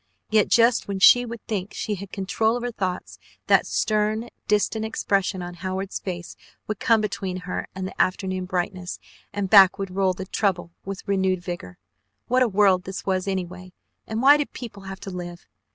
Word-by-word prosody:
Yet 215 -2 +4
just 230 0 +4
when 200 -1 -2
she 245 +5 +7
would 230 -1 -8
think 205 -2 -4
she 215 - -2
had 200 -1 -7
control 220 +4 0
of 240 - -6
her 245 - -2
thoughts, 185 -4 -4 0.3
that - - +4
stern, 215 +2 0 0.2
distant 210 +1 +1
expression 195 -4 -1
on 175 0 -6
Howard's 185 +2 -4
face 175 -2 -6 0.3
would 215 -2 -4
come 225 -2 +3
between 190 -3 -3
her 180 0 -4
and 190 -1 -4
the - - -1
afternoon 185 0 -1
brightness, 180 0 -3 0.3
and 200 -1 -2
back 195 -2 +7
would 195 -2 -4
roll 190 0 +1
the 190 +1 -6
trouble 185 -3 -1
with 195 0 -6
renewed 190 -2 +1
vigor. 175 - -6 0.5
What 255 +1 +2
a 255 - +5
world 195 -2 +3
this 190 0 -6
was 190 0 0
anyway 185 -1 -4 0.3
and 220 +2 -2
why 285 +2 +8
did 295 - -3
people 210 -6 -8
have 190 0 -7
to 195 - -6
live? 175 -1 -7
195 Hz, 185 wpm, -24 LUFS, 185-215 Hz, 0.5 s, why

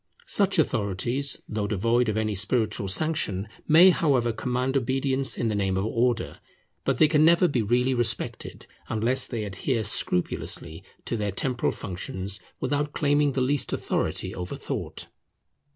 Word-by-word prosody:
Such 200 - +1
authorities, 120 - -1
though 105 -2 -2
devoid 115 +4 +1
of 110 - -1
any 110 -1 0
spiritual 105 +1 0
sanction, 105 - 0 0.2
may, 170 +4 +8
however, 130 -9 +1
command 125 +3 -1
obedience 135 +1 +1
in 120 - 0
the 110 - 0
name 95 -2 0
of 95 - 0
Order. 115 +1 0 0.5
But - - +1
they 155 - +6
can 150 0 +3
never 170 +2 +5
be 130 -7 0
really 125 +4 +2
respected, 120 -2 -2 0.2
unless 115 +4 +2
they 115 -3 -3
adhere 110 +4 -2
scrupulously 90 -5 -2 0.2
to - - -2
their 105 -2 -1
temporal 125 +5 0
functions, 95 +1 -5 0.2
without 145 0 -1
claiming 145 -2 +2
the 130 - 0
least 135 0 0
authority - - -2
over 90 0 -5
thought. - - -5
120 Hz, 150 wpm, -26 LUFS, 105-140 Hz, 0.5 s, may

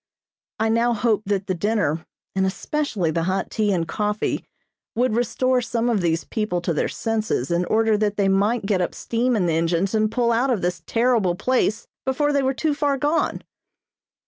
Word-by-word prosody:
I 220 0 +2
now 235 +2 +2
hoped 215 -2 0
that 200 -1 0
the 185 - -1
dinner, 175 -4 -1 0.3
and 190 - +2
especially 200 - -1
the 165 - -1
hot 190 0 -1
tea 215 -2 +1
and 170 -4 0
coffee 210 0 -1 0.5
would 245 0 +1
restore 250 +2 +1
some 235 0 0
of 210 -4 +1
these 165 -1 0
people 210 -5 -2
to 170 -1 -1
their 150 - 0
senses 215 - -2
in 170 +1 +1
order 220 0 +2
that 210 -1 0
they 200 -1 +2
might 200 +3 +2
get 195 -3 +1
up 175 - -2
steam 240 +2 0
in 195 -5 +1
the 170 - +1
engines 170 +4 +1
and 215 -1 +2
pull 235 -1 +1
out 240 +4 +2
of 230 -8 0
this 180 0 -1
terrible 230 -7 +2
place 230 0 0 0.2
before 290 +3 +1
they 280 - +3
were 265 0 0
too 310 +2 0
far 285 -1 0
gone. 295 +4 0
215 Hz, 195 wpm, -23 LUFS, 190-245 Hz, 0.5 s, they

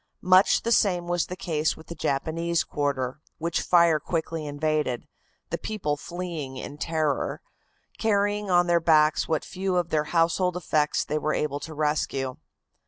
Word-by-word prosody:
Much 185 +1 +5
the 235 - -1
same 180 -6 +3
was 175 -1 0
the 180 - -5
case 155 -4 -1
with 160 - -13
the - - -7
Japanese 165 +3 -1
quarter, 140 -2 -2 0.2
which 170 +1 -1
fire 170 -3 +4
quickly 160 0 -3
invaded, 150 -3 -1 0.4
the - - -2
people 185 -9 -2
fleeing 165 -4 -6
in 140 - -7
terror, 155 -2 -1 0.6
carrying 205 -1 +1
on 175 -1 +4
their 175 -1 +3
backs 155 -2 +3
what 160 -2 -1
few 190 0 -2
of 175 -2 +1
their 155 -2 +1
household 170 +2 +1
effects 155 -3 +1
they 155 - -1
were 155 +1 0
able 145 -1 -1
to 155 +2 -8
rescue. 145 -3 -1
160 Hz, 160 wpm, -26 LUFS, 150-175 Hz, 0.6 s, Much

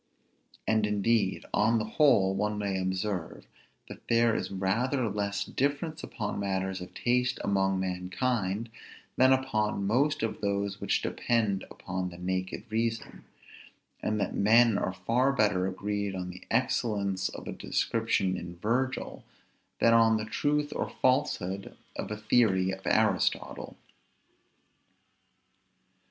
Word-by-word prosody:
And 110 -1 +2
indeed, 105 -1 +1
on 110 +2 +3
the 110 - -1
whole, 110 -6 +4
one 105 +2 -1
may 100 -2 -1
observe, 95 -1 -3 0.4
that - - -12
there 115 -1 +3
is - - -2
rather 115 +7 0
less 100 -1 -2
difference 155 +4 -2
upon 110 -5 -4
matters 95 -1 -2
of 90 - -10
taste 125 +1 +1
among 95 -1 +1
mankind, 95 +4 -2 0.4
than 130 +1 +5
upon 110 -6 +1
most 140 +6 +1
of 115 - -2
those 100 -1 -1
which - - 0
depend 110 -5 0
upon 90 0 -4
the 85 - -11
naked 95 +1 -3
reason; 115 0 -2 0.8
and 105 0 -1
that 100 - -1
men 115 +2 +5
are 100 - 0
far 115 +9 +1
better 105 -8 +2
agreed 100 +1 -3
on 90 -1 -4
the 90 - -11
excellence 105 -6 0
of - - -9
a - - -3
description 110 -5 0
in 85 -1 -7
Virgil, 125 +8 -2 0.5
than 115 - +4
on 115 -1 +5
the 110 - -3
truth 145 +5 0
or - - -2
falsehood 100 -8 0 0.2
of - - -4
a 105 - -4
theory 105 -4 +3
of 95 0 -6
Aristotle. 110 -4 +1
105 Hz, 130 wpm, -29 LUFS, 95-115 Hz, 0.8 s, than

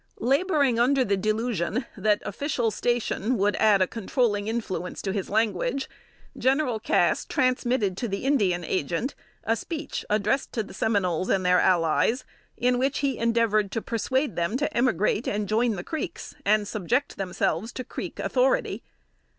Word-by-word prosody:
Laboring 275 -1 +2
under 260 +2 +3
the 200 - +2
delusion 215 +2 -1
that 210 0 +1
official 240 0 -1
station 240 0 0
would 205 0 +2
add 205 -3 +5
a - - -1
controlling 225 - 0
influence 215 -5 -3
to 195 - -1
his 195 -2 -3
language, 220 +5 0 0.5
General 260 -3 +1
Cass - - +2
transmitted 250 -6 +1
to 240 - -2
the 200 +3 -4
Indian 195 -11 +2
Agent 170 - -1 0.3
a 225 - +1
speech, 315 +4 -5
addressed 215 +6 +1
to 225 - -1
the 205 - -12
Seminoles 185 -5 0
and 185 -1 +1
their 180 0 +5
allies, 185 +8 +2 0.3
in 245 0 +2
which 270 +2 +1
he 270 -3 -1
endeavored 230 -3 +2
to 225 - 0
persuade 260 +5 -1
them 170 +8 0
to 295 +2 -2
emigrate 230 -2 +1
and 205 0 -1
join 225 +1 +1
the 175 - -5
Creeks, 315 +7 -5
and 210 0 +2
subject 230 +8 -1
themselves 190 +2 -1
to 255 - -5
Creek - - -7
authority. - - +1
225 Hz, 155 wpm, -26 LUFS, 200-255 Hz, 0.5 s, add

